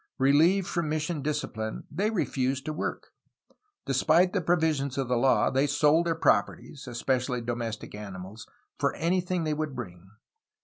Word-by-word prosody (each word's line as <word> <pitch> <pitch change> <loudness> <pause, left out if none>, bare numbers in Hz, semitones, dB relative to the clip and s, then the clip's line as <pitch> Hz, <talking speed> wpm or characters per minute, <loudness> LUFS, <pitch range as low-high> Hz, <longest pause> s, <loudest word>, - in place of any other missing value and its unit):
Relieved 160 +8 +4
from 170 -3 -2
mission 155 0 -2
discipline 135 -7 -3
they 205 +3 0
refused 135 - -1
to 155 - -3
work. - - -4 0.7
Despite 160 +7 +3
the 200 - +1
provisions 160 -5 +1
of 135 -2 -1
the 125 - +1
law, 130 +2 +3
they 135 +2 +2
sold 150 +4 +3
their 165 - +1
properties 135 +1 0
(especially 125 +1 -1
domestic 115 -1 -4
animals) 100 0 -8 0.3
for - - +1
anything 180 +1 0
they 155 -1 0
would 150 -2 -3
bring. 95 -6 -8
140 Hz, 145 wpm, -28 LUFS, 120-160 Hz, 0.7 s, Relieved